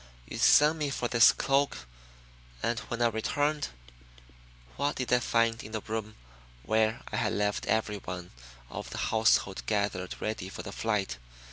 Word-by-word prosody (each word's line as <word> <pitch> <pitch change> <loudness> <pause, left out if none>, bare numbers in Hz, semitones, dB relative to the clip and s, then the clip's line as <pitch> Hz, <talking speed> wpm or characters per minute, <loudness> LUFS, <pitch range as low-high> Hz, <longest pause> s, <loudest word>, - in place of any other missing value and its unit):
"You - - -6
send 150 +2 +6
me 150 -2 0
for 125 -2 -2
this 115 -1 +7
cloak 135 - 0 0.8
and 115 +1 0
when 120 -1 -1
I 120 - +4
returned, 145 +7 0 1.1
what 145 +2 0
did 125 -1 -1
I 125 - +5
find 115 -1 +1
in 110 - -10
the 110 - -2
room 110 0 -5 0.5
where 110 - +1
I - - -2
had - - 0
left 105 0 -1
everyone 100 -5 -2 0.4
of - - -6
the - - -6
household 110 -3 +2
gathered 100 -4 -1
ready 110 -4 -3
for - - -7
the - - -7
flight? 105 - -1
110 Hz, 155 wpm, -29 LUFS, 105-125 Hz, 1.1 s, this